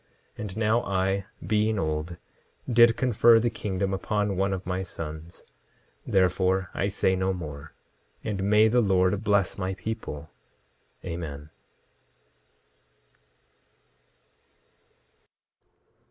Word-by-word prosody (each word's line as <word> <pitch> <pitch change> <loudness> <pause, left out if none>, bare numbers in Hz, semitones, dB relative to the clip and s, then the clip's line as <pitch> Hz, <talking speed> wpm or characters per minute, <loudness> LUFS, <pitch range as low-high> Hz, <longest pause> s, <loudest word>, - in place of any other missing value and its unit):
10:22 - - -19
And 105 -1 -6
now 110 +2 +2
I, 95 0 0 0.2
being 105 +3 +1
old, 80 0 -2 0.5
did 120 -1 +5
confer 120 -2 +5
the 120 +1 0
kingdom 95 -1 -2
upon 105 +1 -1
one 95 +1 0
of 95 -1 -4
my 90 +1 -2
sons; 80 -2 -8 0.6
therefore, 95 0 +2
I 100 - 0
say 95 -1 +1
no 95 +1 0
more. 75 -6 -8 0.5
And 105 -3 -3
may 105 +2 +5
the 120 +2 +3
Lord 95 0 +2
bless 100 -3 +1
my 95 0 -2
people. 95 -8 -6 0.7
Amen. 75 -4 -6
95 Hz, 105 wpm, -26 LUFS, 90-105 Hz, 0.7 s, did